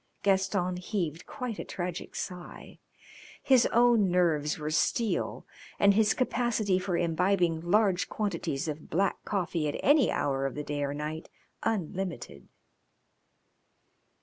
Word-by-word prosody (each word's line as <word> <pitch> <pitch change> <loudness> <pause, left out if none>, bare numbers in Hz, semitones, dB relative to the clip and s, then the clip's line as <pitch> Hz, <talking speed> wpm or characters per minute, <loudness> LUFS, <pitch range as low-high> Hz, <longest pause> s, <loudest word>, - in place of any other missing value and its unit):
Gaston 190 -2 +1
heaved 180 -4 -3
quite 250 -5 -5
a - - -3
tragic 175 -1 -5
sigh. 180 -2 -7 0.6
His 260 -3 +5
own 235 -4 +4
nerves 160 -4 +1
were 150 -1 -4
steel 200 +8 0 0.3
and 200 0 +5
his 215 +1 +3
capacity 230 -6 +1
for 180 -2 -1
imbibing 175 0 +1
large 190 +1 +2
quantities 170 -8 -2
of 155 0 -6
black 195 +4 0
coffee 175 -5 -1
at 145 - -3
any 290 -2 +5
hour 135 -1 0
of 135 - -7
the 150 - -4
day 145 0 -3
or 140 0 -2
night 155 +2 -5 0.3
unlimited. 180 - -3
180 Hz, 125 wpm, -29 LUFS, 160-205 Hz, 0.6 s, His